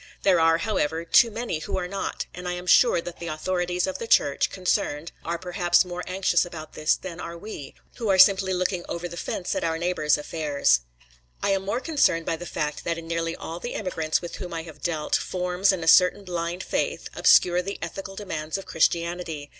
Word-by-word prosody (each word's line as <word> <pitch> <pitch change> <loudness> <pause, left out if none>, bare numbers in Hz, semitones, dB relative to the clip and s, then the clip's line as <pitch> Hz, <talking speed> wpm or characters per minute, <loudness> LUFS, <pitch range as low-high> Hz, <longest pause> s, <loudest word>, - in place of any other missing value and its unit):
There 185 -3 +4
are, 165 0 +4
however, 165 -4 -1
too 230 +7 +6
many 225 -7 -3
who 155 - -4
are 180 -1 -2
not, 195 +2 -4
and 180 0 -7
I 180 - -1
am 180 0 -6
sure 210 0 +5
that 175 0 -8
the 170 - -6
authorities 175 +3 -1
of 190 - -4
the 230 - -5
Church 140 -9 +3
concerned 170 -4 -1
are 170 +1 -2
perhaps 180 +1 +2
more 180 0 -5
anxious 185 -2 +2
about 160 -3 -9
this 155 +1 +2
than 175 -2 -8
are 170 -1 -6
we, 170 -7 -8 0.2
who 225 -3 -2
are 190 - +4
simply 190 0 +6
looking 180 -1 -1
over 170 +1 -3
the 175 - -9
fence 175 +1 -3
at - - -2
our 165 -1 0
neighbours' 165 -4 +1
affairs. 150 - +1 0.6
I - - +2
am 195 -1 +1
more 205 +5 -1
concerned 270 - +2
by 165 - 0
the 175 +2 -8
fact 150 -1 -3
that 170 0 -1
in 165 0 -8
nearly 165 0 -2
all 165 +1 -7
the 240 - -5
immigrants 160 -5 -1
with 175 - -6
whom 175 -2 -6
I 165 - -3
have 160 -3 -12
dealt, 160 -3 -1
forms 180 +2 +1
and 185 -3 -3
a - - -5
certain 180 +4 +6
blind 175 0 -3
faith, - - -2
obscure 180 0 +5
the 195 +2 -5
ethical 195 +3 -6
demands 160 -5 -4
of 195 - -8
Christianity. 170 -2 -1
175 Hz, 210 wpm, -25 LUFS, 165-185 Hz, 0.6 s, too